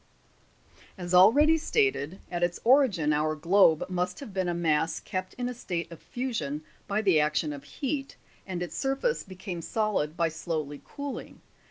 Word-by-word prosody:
12. 180 -3 -7
As - - -2
already 290 - +6
stated, 310 - 0
at 175 -1 -2
its 175 0 0
origin 225 - +4
our 155 +1 +1
globe 165 0 +4
must 180 0 -2
have 250 -8 -9
been 190 -1 0
a 175 - 0
mass 160 -1 +1
kept 185 0 -5
in 245 -1 -2
a 250 - -3
state 175 -8 -4
of 165 - -10
fusion 155 - -3 0.2
by 210 +2 0
the 185 -6 +4
action 150 0 +1
of 140 -1 -9
heat, 275 - -4 0.3
and 180 -2 -3
its 175 - -6
surface 270 - 0
became 185 -2 -7
solid 195 -6 -1
by 170 -2 +3
slowly 155 -3 -4
cooling. 285 -1 -7
180 Hz, 170 wpm, -28 LUFS, 160-230 Hz, 0.3 s, already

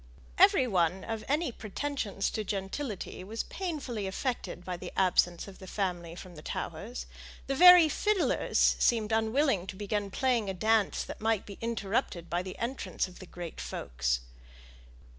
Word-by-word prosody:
Every 260 - +6
one 185 -4 +1
of 225 -1 -4
any 300 +1 +1
pretensions 220 -2 -3
to 215 - -2
gentility 200 +1 -4
was 220 +4 -4
painfully 275 - -4
affected 195 -3 -3
by 180 - -3
the 180 0 -7
absence 175 -2 +2
of 195 - -12
the 190 - -10
family 175 -4 -3
from 185 0 -10
the 150 - -10
Towers; - - -5 0.4
the 275 - -1
very 360 +2 +9
fiddlers 415 +5 +1 0.2
seemed 225 -2 +2
unwilling 220 -2 +2
to 195 - -6
begin 205 0 -2
playing 235 -1 +1
a 190 - -3
dance 220 +1 +2
that - - -8
might 220 -2 +1
be 200 - -10
interrupted 205 -6 -2
by 175 +1 +1
the 185 0 -7
entrance 235 -7 -2
of 180 - -14
the 185 - -10
great 175 -2 -7
folks. - - -2
205 Hz, 160 wpm, -30 LUFS, 185-240 Hz, 0.4 s, very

